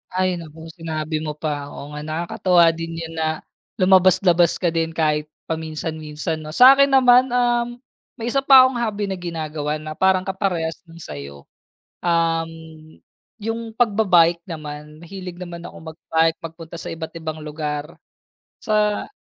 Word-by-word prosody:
Ay 185 -1 +1
naku, 160 0 -10
sinabi 155 -2 -4
mo 150 -1 -4
pa. 150 -2 -3
Oo 145 0 -9
nga, 150 0 -6
nakakatuwa 170 +2 +2
din 165 0 -6
'yon 165 0 -6
na, 160 0 -1 0.3
lumabas-labas 185 -2 +4
ka 175 -3 0
din, 165 0 -2
kahit 150 -1 +1 0.2
paminsan-minsan, 160 0 -4
'no? 155 +1 -8
Sa'kin 275 +2 +8
naman, 255 -1 +5
um, 240 -1 +1 0.4
may 235 +1 -4
isa 275 - +2
pa 270 -1 +8
akong 255 -2 +1
hobby 210 -3 -1
na 190 -2 -4
ginagawa, 155 -3 -3
na 155 0 -7
parang 190 +2 +2
kaparehas 185 -4 -2
nung 165 0 -14
sa'yo. 70 - -9 0.6
Um, 165 -1 +1 0.9
yung 225 +1 -4
pagba-bike 185 -7 +3
naman, 150 -1 -8
mahilig 180 0 -8
naman 175 -2 -8
akong 160 0 -9
mag-bike, 165 0 +1
magpunta 165 0 -9
sa - - -7
iba't 160 -1 -6
ibang 160 -1 -5
lugar, 150 -1 -4 0.7
sa 210 -1 +1
165 Hz, 145 wpm, -21 LUFS, 155-190 Hz, 0.9 s, Sa'kin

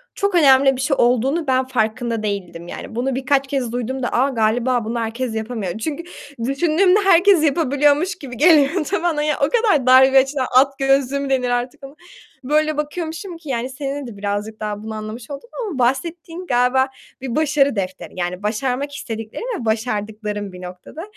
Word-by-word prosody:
çok 400 -2 0
önemli 270 -4 +5
bir 255 - -4
şey 275 0 0
olduğunun 260 +7 +2
ben 260 0 +2
farkında 230 -1 -1
değildim 180 -5 -4
yani. 220 - -8
Bunu 255 +2 -1
birkaç 270 +1 +1
kez 265 -4 -2
duyduğumda 245 +1 -3
"A! 265 +3 +2
Galiba 235 0 +1
bunu 235 +2 -2
herkes 230 +1 -3
yapamıyor." 220 -4 -4
çünkü 300 +8 -4 0.4
düşündüğümde 340 +8 +3
herkes 370 -2 +5
yapabiliyormuş 295 +3 +2
gibi 255 -7 -9
geliyordu 310 +1 +4 0.2
bana 310 -4 +1
ya. 300 0 0
O - - +1
kadar 435 - +2
dar 260 +1 +8
bir 270 - +6
açıdan 265 -1 +2
at 275 +1 +4
gözlülüğü 270 0 +2
mü 280 -1 -3
denir 255 -2 +1
artık 245 +3 -3
ona? 275 +2 -12 0.5
Böyle 305 +2 +1
bakıyormuşum 330 +4 -4
ki, 320 -3 -12
yani, 250 0 -2
seninle 275 0 -5
de 215 -4 -10
birazcık 205 +2 -4
daha 210 -1 -4
bunu 220 0 -6
anlamış 215 +5 -7
oldum. 285 +12 -8 0.2
Ama 300 -9 -5
bahsettiğin 330 +7 -2
galiba 250 +2 +2 0.3
bir 255 -3 -4
başarı 290 -3 +2
defteri 190 -1 -4
yani 180 +2 -3
başarmak 250 +6 -2
istediklerim 225 - -6 0.2
ve - - -6
başardıklarım 210 -2 -3
bir 180 - -10
noktada. 180 - -9
260 Hz, 175 wpm, -20 LUFS, 225-295 Hz, 0.5 s, dar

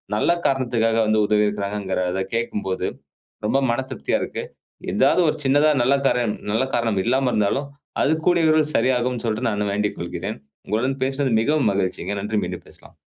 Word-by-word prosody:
நல்ல 110 - +2
காரணத்துக்காக 120 -4 +1
வந்து 110 0 +2
உதவி 105 0 +3
இருக்கிறாங்கங்கிறத 100 -2 -2
கேட்கும்போது 105 -5 -2 0.6
ரொம்ப 135 +5 +2
மனதிருப்தியா 130 +3 -1
இருக்கு. - - -4 0.5
எதாவது 140 +7 +3
ஒரு 155 - 0
சின்னதா 145 +3 +4
நல்ல 135 +3 +3
காரணம் 120 -4 +1 0.2
நல்ல 115 +5 +1
காரணம் 115 -5 0
இல்லாம 130 +2 +2
இருந்தாலும், 110 +7 0 0.3
அது 155 - +3
கூடிய 175 -2 +3
விரைவில் 155 -1 +2
சரியாகும்னு 125 0 +1
சொல்லிட்டு 115 +2 0
நானு 105 -1 -1
வேண்டிக் 105 0 -1
கொள்கிறேன். 90 +4 -5 0.3
உங்களுடன் 130 +6 -1
பேசினது 135 -1 0
மிகவும் 150 -3 +2
மகிழ்ச்சிங்க. 100 +1 -2
நன்றி! 105 +1 -1
மீண்டும் - - -6
பேசலாம். - - -17
115 Hz, 150 wpm, -22 LUFS, 105-135 Hz, 0.6 s, சின்னதா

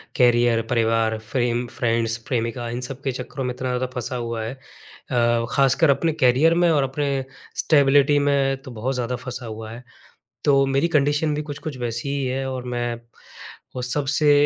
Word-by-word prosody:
Career, 120 -2 +4
परिवार, 115 -1 +2
frame 120 -1 0
friends, 115 -2 0
प्रेमिका 120 -1 -2
इन 120 +2 -4
सब 135 0 -7
के 135 - 0
चक्करों 130 +2 -5
में 125 - -2
इतना 130 0 -4
ज़्यादा 125 +1 0
फँसा 125 +1 -4
हुआ 115 -2 -3
है 115 +4 -4
अ, 120 -3 -2
ख़ासकर 140 +3 +3
अपने 160 +4 +2
कैरियर 130 +5 +4
में 175 -1 +4
और 145 -3 +3
अपने 140 +2 -2 0.5
स्टेबिलिटी 145 -1 +4
में 140 -1 +1
तो 130 - -9
बहुत 120 +4 -3
ज़्यादा 125 0 -2
फँसा 125 0 -7
हुआ 110 0 -7
है। 120 +2 -9 0.6
तो 140 -1 +4
मेरी 135 +5 +1
कंडीशन 150 0 +2
भी 150 - -2
कुछ-कुछ 150 -1 -6
वैसी 120 +2 -3
ही 140 -1 -1
है 135 +1 -2
और 130 -1 -5
मैं 120 -1 -2 0.8
उस 125 0 -2
सब 145 -2 -1
से 150 +1 +3
130 Hz, 180 wpm, -23 LUFS, 120-140 Hz, 0.8 s, कैरियर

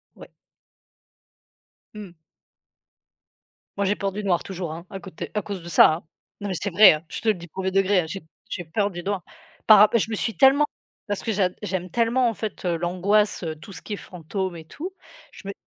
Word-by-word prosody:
Ouais. - - -13 1.6
Mmh. 210 -4 -9 1.7
Moi 200 - +1
j'ai 200 +2 +2
peur 195 -1 -2
du 210 +2 -5
noir 180 -4 +1
toujours, 180 -4 -5
hein, 170 +2 -9
à 195 - -7
côté 180 -3 -8
à 210 - 0
cause 195 -3 -6
de 170 - -8
ça, 165 - +7
hein! 160 - -5 0.4
Non 205 - -3
mais 190 - -2
c'est 200 - -2
vrai, 205 +2 +8
hein, 155 +1 -5
je - - -6
te - - -5
le - - +5
dis 170 -1 -10
1er 190 +3 -3
degré, 195 0 +3
hein, - - -5
j'ai 195 +4 -5
p 160 - -27 0.2
j'ai 175 - -5
peur 200 +6 -1
du 175 -1 -6
noir 195 0 -3 0.4
par 215 - +9
rap 210 +3 +6
je 220 - -1
me - - 0
suis 225 +1 -2
tellement 275 +2 +6 0.4
parce 205 -1 -3
que 225 - -1
j'ad 190 -3 +1
j'aime 185 -3 -3
tellement 240 +4 +2
en 230 - 0
fait, 215 -3 -6
heu, 175 -1 +1
l'angoisse, 185 +5 +1
heu, 160 -2 -3
tout 160 +7 -13
ce - - -8
qui 215 - -6
est - - -1
fantôme 185 0 -5
et 160 - -11
tout, 345 - -7 0.4
je - - -12
me 200 - -4
195 Hz, 225 wpm, -24 LUFS, 175-210 Hz, 1.7 s, par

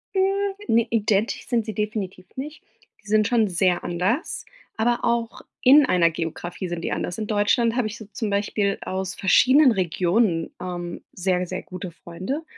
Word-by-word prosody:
Hm, 390 +1 +1
ne, 230 +1 +3
identisch 215 -1 0
sind 230 -3 0
sie 215 - -4
definitiv 210 -4 -3
nicht. 295 +4 -7 0.4
Die - - -19
sind 215 0 +3
schon 230 -3 +3
sehr 180 -1 +1
anders, 185 - -1 0.3
aber 240 +2 +2
auch 235 -1 -1 0.2
in 285 +3 +7
einer 175 -8 +4
Geografie 175 +3 -5
sind 175 -1 -4
die - - -3
anders. 175 - -3
In 215 -1 -3
Deutschland 225 +2 +2
habe 245 -4 +1
ich 215 - -7
so 220 - -10
zum 220 0 -3
Beispiel 200 0 0
aus 190 +1 -4
verschiedenen 255 +8 +5
Regionen, 180 -1 +1
ähm, 175 -1 -5
sehr, 180 0 0
sehr 185 +1 -5
gute 185 0 -7
Freunde. 185 - -5
205 Hz, 165 wpm, -24 LUFS, 180-235 Hz, 0.4 s, in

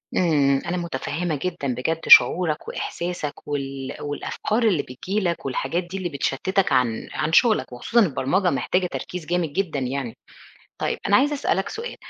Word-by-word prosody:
امم، 140 -6 +3
أنا 180 - -2
متفهمة 170 0 -3
جدًا 175 -6 -3
بجد 160 +7 -1
شعورك 155 +4 +6
وإحساسك، 170 -4 -5
وال 135 -2 -4
والأفكار 210 +10 -2
اللي 195 -10 +2
بتيجي 185 +11 -3
لك 175 -4 -2
والحاجات 135 +6 -1
دي 180 +2 -7
اللي 185 -2 -3
بتشتتك 165 +6 0
عن 125 -4 +1
عن 160 - -2
شغلك، 220 - +4
وخصوصًا 225 - +2
البرمجة 180 +5 +1
محتاجة 180 +5 0
تركيز 180 -1 -6
جامد 170 -3 -1
جدًا 165 -5 -1
يعني. 130 -2 -3 0.6
طيّب - - -1
أنا 200 - +5
عايزة 290 +3 +3
أسألك 195 -8 0
سؤال، 470 +2 -6
165 Hz, 155 wpm, -23 LUFS, 140-185 Hz, 0.6 s, شعورك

